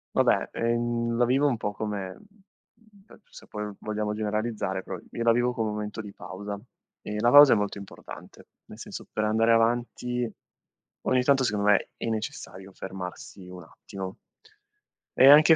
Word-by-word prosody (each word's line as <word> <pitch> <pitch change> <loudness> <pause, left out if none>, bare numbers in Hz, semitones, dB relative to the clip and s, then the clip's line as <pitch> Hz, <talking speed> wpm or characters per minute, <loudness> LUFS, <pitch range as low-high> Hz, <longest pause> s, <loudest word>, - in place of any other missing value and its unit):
Vabbè, - - +3
ehm, 120 0 0
la 120 - +4
vivo 135 +4 +3
un 130 -5 +1
po' 105 -1 -3
come- 105 -2 -3 1.0
ehm, - - -16
se - - -13
poi 105 0 -5
vogliamo 105 0 -2
generalizzare- 105 -2 -2
però - - -5
io 115 - -3
la 115 - +5
vivo 120 +1 +2
come 110 -3 -1
un - - -3
momento 105 +1 -4
di 105 -2 -10
pausa, 100 +3 -7 0.4
e 105 - -5
la 120 +2 +4
pausa 145 0 +9
è - - +5
molto 105 -1 -1
importante, 100 - -11 0.2
nel - - -13
senso, - - -8
per 110 - -1
andare 110 +2 +3
avanti, 120 +1 0 0.7
ogni 130 -1 +2
tanto 135 0 +4
secondo 105 -3 +1
me 100 - +2
è - - -4
necessario 100 -3 -5
fermarsi 95 0 -8
un 90 -1 -9
attimo. 95 +3 -8 1.0
E 135 - +9
anche 155 +3 +9
110 Hz, 165 wpm, -27 LUFS, 105-120 Hz, 1.0 s, pausa